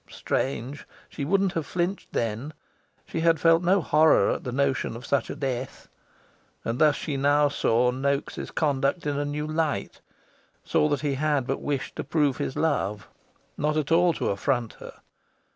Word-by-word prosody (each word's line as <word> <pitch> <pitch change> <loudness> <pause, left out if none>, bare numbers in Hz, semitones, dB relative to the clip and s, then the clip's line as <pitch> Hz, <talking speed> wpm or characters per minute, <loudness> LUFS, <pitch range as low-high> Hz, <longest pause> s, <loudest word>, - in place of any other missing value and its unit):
Strange! 135 +1 -3 0.2
she 145 - -5
wouldn't 195 +5 +2
have 160 -3 -3
flinched 180 +2 -2
then. 115 +6 -2 0.5
She - - -4
had 165 0 +3
felt 165 0 +5
no 185 +2 +3
horror 155 0 +4
at - - -3
the 125 - -4
notion 135 -2 0
of 120 - -9
such 140 -4 0
a - - -4
death. 130 -3 -4 0.8
And 115 +2 -2
thus 150 -2 +5
she 145 -3 -3
now 145 +1 +3
saw 125 -3 +2
Noaks' 140 +2 -2
conduct 140 +1 0
in 145 -1 -1
a 145 - -1
new 150 +1 -3
light 155 -9 -2 0.6
saw 150 - +2
that 145 -2 0
he 145 -2 0
had 145 -1 0
but 135 +1 -2
wished 140 -2 -3
to - - -2
prove 145 -5 +1
his - - -3
love, 105 -10 -1 0.5
not 150 +1 0
at 155 0 -1
all 175 +1 +5
to - - -2
affront 120 +3 -1
her. - - -11
145 Hz, 175 wpm, -26 LUFS, 130-155 Hz, 0.8 s, felt